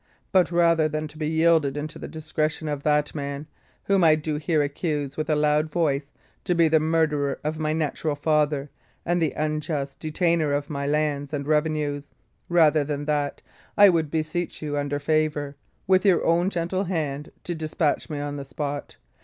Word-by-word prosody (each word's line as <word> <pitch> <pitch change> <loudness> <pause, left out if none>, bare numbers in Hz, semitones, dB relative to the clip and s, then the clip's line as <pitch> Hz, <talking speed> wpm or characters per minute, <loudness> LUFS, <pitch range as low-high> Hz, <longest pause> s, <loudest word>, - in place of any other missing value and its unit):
But 180 -3 +3
rather 170 -2 +3
than 155 0 -3
to 150 - -15
be 155 - -1
yielded 160 -3 +3
into 155 +2 -5
the - - -6
discretion 155 0 -2
of 145 -2 -2
that 150 0 +1
man 140 0 -4 0.4
whom 195 -2 +2
I 155 -2 +6
do 155 -1 -3
here 155 0 +1
accuse 145 -1 -2
with 155 0 -3
a 155 - +3
loud 150 +1 +2
voice 145 -4 0 0.4
to 180 - +1
be 170 -1 +5
the 160 0 +4
murderer 155 -3 +1
of 155 +1 -2
my 155 -1 0
natural 155 -1 -1
father 150 -1 +1 0.3
and 175 +1 +1
the 160 - +2
unjust 150 -2 -3
retainer 160 -1 +1
of 145 +1 -2
my 140 -1 -2
lands 145 -1 -1
and 140 -1 -2
revenues 150 -1 0 0.4
rather 160 -3 +4
than 145 0 -3
that, 145 -1 -1 0.3
I 205 -1 +9
would 165 -4 +1
beseech 160 +3 -2
you, 150 -1 -3
under 145 0 -1
favour, 150 -1 0 0.3
with 185 0 +4
your 190 -4 +3
own 175 +3 +3
gentle 185 +2 -2
hand, 150 -5 -3
to 175 - -3
despatch 155 -1 -1
me 150 -2 -4
on 145 0 -4
the 140 - -5
spot. 145 +1 -5
155 Hz, 180 wpm, -25 LUFS, 145-160 Hz, 0.4 s, I